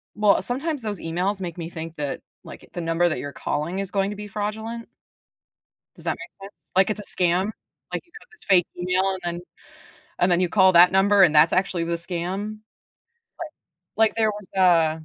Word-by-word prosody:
Well, 210 -1 +3
sometimes 280 +4 -3
those 210 -4 -4
emails 185 +5 -2
make 175 -2 -5
me 165 -1 -5
think 165 -1 -7
that, 145 -3 -4 0.2
like, - - -12
the 175 - -4
number 165 +1 +1
that 155 - -2
you're 145 - -5
calling 155 +7 -3
is 195 -1 -3
going 195 -1 0
to - - -6
be 210 0 -7
fraudulent 220 +3 -5 1.1
Does - - -13
that - - -1
make 195 - -11
sense? - - -34
Like, 190 +2 +4
it's 215 - -2
a 210 - -2
scam. 180 +1 +2 0.5
Like, - - -3
you 340 - -32
got - - -20
this 435 - -17
fake 180 -3 +5
email 180 +1 +1
and 190 -1 -4
then 175 0 -3 0.8
and 180 +1 +3
then 175 - +3
you 180 -1 +1
call 190 0 +5
that 175 +1 +7
number 195 +1 +4
and 160 -4 +4
that's 150 +2 +6
actually 185 -2 0
the 170 +1 -2
scam? 185 +5 -4 1.4
Like 220 0 +5
Like, - - -24
there 220 -1 +2
was 210 -2 -9
a 165 -4 +3
185 Hz, 205 wpm, -24 LUFS, 170-210 Hz, 1.4 s, that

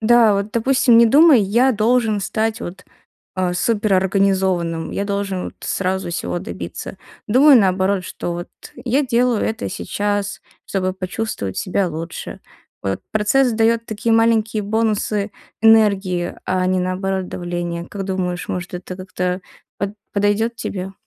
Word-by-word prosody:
Да, 225 -1 +5
вот, 200 +2 -2
допустим, 250 +1 +3
не 235 0 +7
думай: 290 +1 +6
"Я 235 +7 +3
должен 220 -1 +2
стать 220 +3 -1
вот, 185 -3 -7 0.5
а, 185 -1 0
суперорганизованным, 190 -4 +1
я 200 - -2
должен 200 -2 -2
вот - - -7
сразу 190 -1 -2
всего 170 +1 -3
добиться". 190 - -7 0.3
Думай 270 +6 +6
наоборот, 190 -2 +2
что 175 -1 -5
вот 175 0 -6 0.4
я 260 +4 +2
делаю 240 -2 +2
это 220 - -2
сейчас, 205 0 -2 0.2
чтобы 185 -1 -1
почувствовать 185 - -4
себя 190 0 0
лучше. 165 +1 -6 0.4
Вот 95 0 -2
процесс 240 +5 +2
дает 230 +1 +2
такие 220 +1 -2
маленькие 225 -1 +2
бонусы 215 -1 0 0.3
энергии, 200 -5 +3
а 185 0 0
не 185 0 +1
наоборот 185 +1 -2
давления. 175 -1 -4
Как 195 +2 -6
думаешь, 185 -2 -3
может, 180 0 -4
это 180 +1 -6
как-то 180 0 -3 0.4
под 200 +1 -3 0.2
подойдет 205 +3 +1
тебе? 190 -4 -5
200 Hz, 135 wpm, -20 LUFS, 185-225 Hz, 0.5 s, не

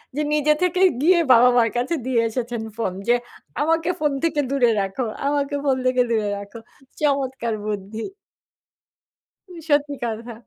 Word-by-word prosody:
যে 300 - 0
নিজে 300 0 +3
থেকেই 365 +1 +4
গিয়ে 345 +3 +5
বাবা-মার 240 -1 +5
কাছে 255 +8 0
দিয়ে 255 -3 +2
এসেছেন 235 0 -4 0.2
ফোন 205 -5 -2
যে, 240 - +5 0.5
"আমাকে 325 +3 +1
ফোন 300 -1 +1
থেকে 310 -3 +1
দূরে 250 -4 +3
রাখো, 195 +6 -3 0.2
আমাকে 285 0 0
ফোন 275 -2 +2
থেকে 255 0 +3
দূরে 215 -3 +1
রাখো।" 200 +3 -9 0.4
চমৎকার 265 -5 0
বুদ্ধি। 210 +2 -4 1.5
উ - - -11 0.2
সত্যি 290 -1 +2
কথা। 230 +1 -4
255 Hz, 145 wpm, -22 LUFS, 230-295 Hz, 1.5 s, গিয়ে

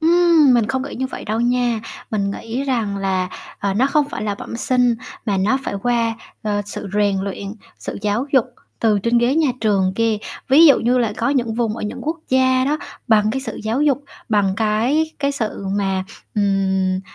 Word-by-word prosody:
Ừm, 330 -4 +5
mình 230 -3 +3
không 260 +1 -1
nghĩ 280 - -6
như 260 - -2
vậy 260 - -8
đâu 220 +2 -1
nha. 240 -1 +1 0.3
Mình 200 -2 0
nghĩ 230 +5 -4
rằng 230 -7 -1
là, 190 -2 -1 0.3
ờ, 200 -1 -1
nó 245 +6 +3
không 290 0 +1
phải - - -5
là 210 -1 -1
bẩm 220 - -7
sinh 250 -1 +2 0.3
mà 200 -2 +1
nó 205 +8 +2
phải - - -3
qua, 235 -2 +1 0.3
ờ, 205 -1 -1
sự 205 0 -6
rèn 205 -1 +2
uyện, 200 +1 -5 0.2
sự - - -6
giáo 210 +5 0
dục 265 -5 +5 0.4
từ 215 -3 +3
trên 235 +4 +2
ghế 240 +3 +2
nhà 315 -2 +3
trường 195 -4 +2
kia. 225 -1 +1 0.3
Ví 300 +5 +8
dụ 280 - +7
như 245 +2 +2
là 230 -4 +1
có - - 0
những 240 -5 0
vùng 225 -2 -1
ở - - -6
những 210 - -4
quốc 320 +3 -2
gia 260 0 +3
đó, 295 +3 0 0.3
bằng 215 -1 +4
cái 265 +4 -2
sự 230 -5 -6
giáo 225 +6 0
dục, 285 -1 +1 0.2
bằng 205 -4 +2
cái 230 +9 +1
cái 280 0 0
sự 220 -7 -4
mà, 190 -2 0 0.3
ừm, 190 -2 +1
230 Hz, 205 wpm, -20 LUFS, 205-260 Hz, 0.4 s, Ví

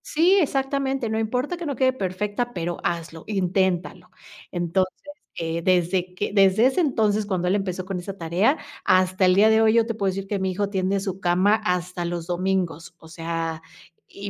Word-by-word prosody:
Sí, 355 +6 +3
exactamente. 270 -3 -1
No 220 0 -1
importa 250 +9 -2
que 345 - -6
no 285 -3 -2
quede 260 +1 +2
perfecta, 210 +3 -3
pero 175 -1 -3
hazlo, 165 -1 -3
inténtalo. 190 -3 -1 0.4
Entonces, 180 +2 0 0.4
eh, 165 0 -3
desde 180 +1 +1
que 205 - -2
desde 195 +2 +5
ese 265 +8 +3
entonces, 215 -8 +1
cuando 185 -3 -1
él 185 - +2
empezó 185 -2 -3
con 190 -1 -4
esa 195 +2 -7
tarea, 180 - +1 0.3
hasta 185 0 +3
el 185 0 +4
día 210 +3 +6
de 220 0 +4
hoy, 220 -1 +4
yo 230 -1 +4
te 230 - -3
puedo 200 -3 -1
decir 195 +1 -5
que 200 0 -2
mi 190 0 -1
hijo 200 +2 -2
tiende 195 0 0
su 190 -1 -4
cama 190 +4 +2
hasta 180 0 -2
los 170 -1 -3
domingos. 180 -2 -2
O 165 - -16
sea, 165 -1 -4 0.5
y 200 0 -8
190 Hz, 190 wpm, -24 LUFS, 175-220 Hz, 0.5 s, día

